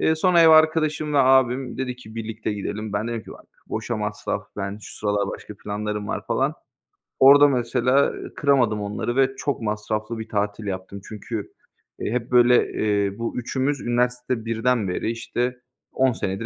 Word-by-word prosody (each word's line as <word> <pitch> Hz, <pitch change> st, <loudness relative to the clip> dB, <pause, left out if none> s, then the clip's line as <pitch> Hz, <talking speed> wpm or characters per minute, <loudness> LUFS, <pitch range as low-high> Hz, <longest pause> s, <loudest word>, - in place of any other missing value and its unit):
Eee, 160 Hz, -, +3 dB
sonra 170 Hz, +1 st, +4 dB
ev 165 Hz, -, +7 dB
arkadaşımla 155 Hz, -3 st, +4 dB
abim 130 Hz, 0 st, +2 dB
dedi 125 Hz, -1 st, -3 dB
ki 110 Hz, -3 st, -13 dB
birlikte 110 Hz, -1 st, -4 dB
gidelim. 105 Hz, +1 st, -5 dB
Ben 105 Hz, +3 st, -1 dB
dedim 115 Hz, -2 st, -3 dB
ki, -, -, -11 dB
"Bak, -, -, -16 dB, 0.2 s
boşa 115 Hz, +1 st, -3 dB
masraf, 105 Hz, 0 st, -3 dB
ben 100 Hz, +1 st, -4 dB
şu -, -, -10 dB
sıralar 105 Hz, -1 st, 0 dB
başka 105 Hz, -, -8 dB
planlarım 105 Hz, 0 st, -3 dB
var." -, -, -3 dB
falan. -, -, 0 dB, 0.7 s
Orada 145 Hz, +2 st, +8 dB
mesela 125 Hz, +2 st, +2 dB, 0.2 s
kıramadım 125 Hz, -7 st, +2 dB
onları 105 Hz, +4 st, -3 dB
ve 135 Hz, 0 st, +2 dB
çok 140 Hz, -, -2 dB
masraflı 110 Hz, +1 st, -3 dB
bir 110 Hz, -, -7 dB
tatil 105 Hz, 0 st, -2 dB
yaptım. 95 Hz, +1 st, -5 dB
Çünkü, 110 Hz, 0 st, -6 dB, 0.5 s
eee, -, -, -3 dB
hep 125 Hz, 0 st, -3 dB
böyle, 125 Hz, 0 st, +5 dB
eee, 100 Hz, -2 st, 0 dB
bu 115 Hz, +1 st, -3 dB
üçümüz 130 Hz, +3 st, -1 dB
üniversite 125 Hz, -1 st, -1 dB
1'den 115 Hz, -1 st, 0 dB
beri, 90 Hz, +5 st, -1 dB
işte, 125 Hz, +1 st, -3 dB, 0.3 s
10 130 Hz, 0 st, +3 dB
senedir 100 Hz, +2 st, -3 dB
115 Hz, 165 wpm, -23 LUFS, 105-130 Hz, 0.7 s, Orada